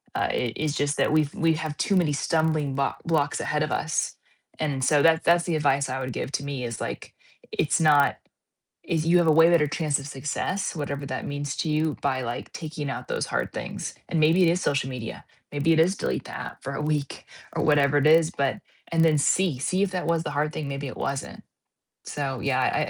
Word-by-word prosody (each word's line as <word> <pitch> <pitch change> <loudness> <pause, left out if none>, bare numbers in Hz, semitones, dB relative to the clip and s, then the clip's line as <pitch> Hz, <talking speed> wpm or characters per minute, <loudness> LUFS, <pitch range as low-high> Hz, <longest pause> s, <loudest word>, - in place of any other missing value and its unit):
uh, - - +1
i 120 -2 -1
is 155 -1 -1
just 145 0 0
that - - +2
we've 155 -2 +2
we 165 -1 +2
have 155 -1 -4
too 200 - +1
many 165 -5 +2
stumbling 155 -1 0
blo 140 0 +1
blocks 155 -4 +1
ahead 150 0 0
of 155 - -3
us, 160 0 -1 0.4
and 145 -4 -1
so 145 +2 +4
that 160 0 +4
that's 170 0 +4
the 170 - 0
advice 140 -2 +1
I 130 - -2
would 130 -1 -4
give 135 - -4
to - - -1
me 140 -3 -4
is, 115 -1 -5
like, - - -5 0.4
"It's 160 +3 +1
not" 145 -3 +4 0.7
is, 160 -1 -1
"You 175 +2 +5
have 175 - +3
a - - +6
way 165 +2 +7
better 160 -4 +4
chance 150 -1 0
of 140 - -8
success, 150 +9 -3
whatever 140 -2 -4
that - - -4
means 145 0 -4
to - - -1
you, 155 0 0
by, 130 -2 0
like, 120 0 -5
taking 155 -3 -5
out - - -6
those - - -1
hard - - -2
things," - - -5
and 165 - -1
maybe 165 +4 +5
it 170 - +5
is 175 +2 +1
social 140 -6 0
media, 120 -3 -6 0.3
maybe 145 +3 +2
it 160 - +4
is 180 +5 +3
delete - - -2
the - - -7
app - - -8
for 140 - -5
a 145 - -3
week 150 -2 -2 0.3
or - - -1
whatever 145 -2 +4
it 145 - +2
is, 160 +1 +5
but 140 -1 -1 0.4
and 165 0 +4
then 155 -2 +4
see, 165 0 +2
see 185 +8 0
if 200 - +1
that 180 -1 -2
was 165 -1 +1
the - - -4
hard 150 +1 -1
thing, 150 -3 -4
maybe 140 +1 -4
it 130 - -7
wasn't. 140 -1 -4 0.6
So 135 -3 -3
yeah, 130 -2 +1
I - - +1
150 Hz, 230 wpm, -25 LUFS, 140-160 Hz, 0.7 s, way